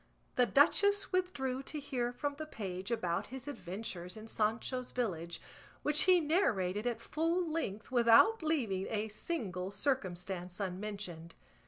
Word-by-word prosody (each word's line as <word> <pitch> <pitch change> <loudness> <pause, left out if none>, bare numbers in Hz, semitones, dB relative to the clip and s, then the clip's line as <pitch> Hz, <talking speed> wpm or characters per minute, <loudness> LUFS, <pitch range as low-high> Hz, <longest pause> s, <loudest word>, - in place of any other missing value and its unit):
The 250 -1 +4
duchess 405 +10 +4
withdrew 275 -9 0
to 300 +2 -5
hear 250 -4 -2
from 285 +3 -2
the 310 - -4
page 190 -7 -5
about 180 -8 -1
his 265 +1 -8
adventures 180 -6 -5
in 215 +1 -9
Sancho's 225 +4 -1
village, 170 -8 -2 0.4
which 300 0 +3
he 365 -1 +7
narrated 225 - +1
at 240 - -1
full 330 +3 0
length 250 -10 -3
without 245 - +6
leaving 240 - 0
a 220 0 -1
single 205 - -3
circumstance 185 -6 -2
unmentioned. 185 -3 -5
230 Hz, 135 wpm, -34 LUFS, 190-290 Hz, 0.4 s, he